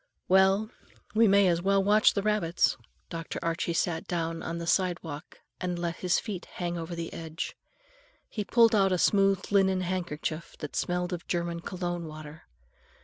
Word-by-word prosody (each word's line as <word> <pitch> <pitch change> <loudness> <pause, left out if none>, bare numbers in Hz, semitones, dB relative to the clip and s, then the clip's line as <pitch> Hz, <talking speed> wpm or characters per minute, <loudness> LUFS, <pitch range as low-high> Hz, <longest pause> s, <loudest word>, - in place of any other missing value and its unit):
"Well, 190 +4 +4 0.4
we 225 +1 +5
may 200 0 +5
as 170 -1 +2
well 195 +1 +3
watch 210 +2 +5
the 200 - 0
rabbits." 210 -6 +2 0.4
Dr. 165 -1 -5
Archie 165 0 -1
sat 165 -1 -1
down 165 -1 -2
on 170 - -4
the 170 - -4
sidewalk 170 -4 -2 0.2
and 180 -1 -2
let 170 -1 -3
his 180 -1 +1
feet 195 -5 -4
hang 175 -1 -3
over 170 0 -5
the 165 -1 -5
edge. 160 0 -5 0.7
He 210 - -4
pulled 230 +2 +4
out 195 -2 +4
a 185 - +2
smooth 195 +1 +3
linen 190 -2 +3
handkerchief 170 -3 -3
that 150 - -7
smelled 180 +1 -1
of 175 - -6
German 170 -1 -1
cologne 175 -1 -4
water. 155 0 -10
175 Hz, 165 wpm, -28 LUFS, 170-195 Hz, 0.7 s, we